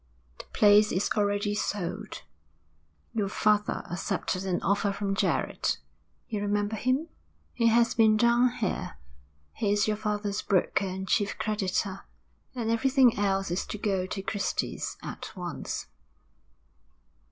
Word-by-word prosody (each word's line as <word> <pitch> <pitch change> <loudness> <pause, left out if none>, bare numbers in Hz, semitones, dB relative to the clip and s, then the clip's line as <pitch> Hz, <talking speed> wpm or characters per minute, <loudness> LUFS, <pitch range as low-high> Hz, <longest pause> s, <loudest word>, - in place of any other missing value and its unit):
'The - - -8
place 210 0 +5
is 185 - 0
already 205 0 +1
sold. 200 - -3 0.9
Your 210 -3 0
father 210 +1 +1
accepted 185 +1 -2
an 180 -2 0
offer 200 +1 +1
from 200 0 -2
Jarrett 195 -4 0 0.5
you 210 -2 -3
remember 205 +1 0
him, 255 +8 0 0.5
he 230 -1 +2
has 230 +1 +4
been 220 -1 +5
down 235 +2 +4
here; 210 -6 -3 0.6
he 205 -2 0
is 205 0 +2
your 210 -1 0
father's 210 -1 -2
broker 195 0 +1
and 190 +1 -5
chief 205 +1 +1
creditor 195 -2 -1 0.5
and 230 -2 -1
everything 255 +1 +4
else 195 -2 +1
is 175 - 0
to - - -5
go 195 -3 -1
to 195 0 -5
Christy's 195 -1 -2
at - - -7
once.' - - -5
205 Hz, 130 wpm, -28 LUFS, 195-220 Hz, 0.9 s, place